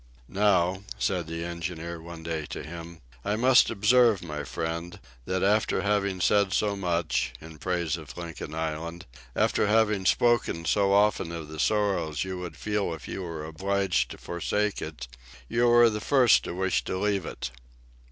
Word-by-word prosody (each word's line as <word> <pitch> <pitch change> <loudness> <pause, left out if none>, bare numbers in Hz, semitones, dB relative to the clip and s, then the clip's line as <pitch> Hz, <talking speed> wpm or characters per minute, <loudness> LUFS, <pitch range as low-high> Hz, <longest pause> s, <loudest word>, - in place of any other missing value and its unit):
"Now," 95 -2 +2 0.2
said 90 -4 -1
the 85 +1 -4
engineer 85 -1 -5
one 85 -1 -9
day 80 -3 -3
to - - -6
him, 85 +1 -9 0.2
"I 105 +1 0
must 125 +3 +5
observe, 115 -1 +4
my 75 -3 -5
friend, 80 +6 -4 0.3
that 95 0 -1
after 105 +2 +2
having 100 -2 0
said 100 -1 +3
so 105 -1 +1
much, 85 -4 -1
in 80 -1 -12
praise 85 -2 -1
of 75 -5 -11
Lincoln 80 -3 -6
Island, 80 +2 -4 0.3
after - - +2
having 105 -3 +2
spoken 120 -9 +2
so 100 +1 +2
often 100 -4 +3
of 80 -3 -6
the 80 0 -8
sorrow 100 -7 +1
you 95 +2 -2
would 90 -2 -7
feel 105 -5 -1
if 75 - -11
you - - -5
were 80 -4 -5
obliged 95 -1 0
to - - -8
forsake 105 +4 -2
it, - - -6 0.4
you 120 +1 +2
are 120 0 +7
the 105 -2 -1
first 130 -2 +4
to - - -5
wish 95 0 0
to 95 - -2
leave 100 -3 0
it." - - -5
90 Hz, 170 wpm, -27 LUFS, 85-105 Hz, 0.4 s, are